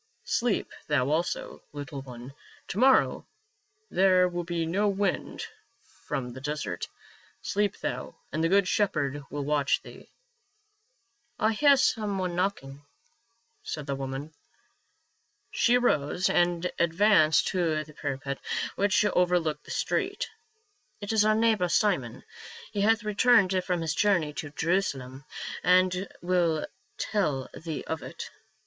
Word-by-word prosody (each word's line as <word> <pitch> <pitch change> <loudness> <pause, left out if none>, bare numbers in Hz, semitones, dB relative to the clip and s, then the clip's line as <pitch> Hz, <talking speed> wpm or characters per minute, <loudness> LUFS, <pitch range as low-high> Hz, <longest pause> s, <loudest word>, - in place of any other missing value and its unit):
Sleep 235 -3 0 0.2
thou 140 -2 +1
also, 165 +3 -2
little 145 -1 -6
one; 125 0 -10 0.4
to 195 - -3
morrow 265 +1 +4 0.6
there 185 -1 +4
will 175 -1 -3
be 170 -1 -2
no 195 +6 +1
wind 200 -1 -1 0.6
from 125 -2 -3
the 130 - -9
desert. 145 -11 -3 0.6
Sleep 205 0 0
thou, - - -4 0.2
and 155 +3 -1
the 165 - +2
good 200 0 +4
Shepherd 145 -9 0
will 145 0 -4
watch 145 -1 +2
thee." - - -13 0.7
" 240 - -44
I 220 - +3
hear 280 +5 +5
some 215 -6 +1
one 180 -2 -2
knocking," 145 -7 -2 0.8
said 150 -2 -5
the 140 - -2
woman. 135 +3 -5 1.2
She 240 +1 +3
arose 180 -6 +1
and 175 0 +1
advanced 170 -1 +4
to 165 -4 0
the 155 0 -15
parapet 140 -1 -4 0.4
which 200 +1 +2
over 180 -3 +3
looked 155 -3 -4
the - - -14
street. - - -1 0.4
" 410 -1 -42
It 205 +2 -3
is 215 -1 +4
our 215 0 +4
neighbor, 220 -5 +2
Simon; 170 - +1 0.5
he 200 - -2
hath 225 +2 +3
returned 210 -3 +3
from 180 -2 -1
his 160 -2 -1
journey 175 -4 +2
to 145 - -5
Jerusalem 140 -5 -2 0.4
and 185 +2 +3 0.2
will 175 -3 +1 0.3
tell 150 -11 -1
thee 160 -2 -5
of 160 - -4
it. - - -8
175 Hz, 135 wpm, -28 LUFS, 150-205 Hz, 1.2 s, hear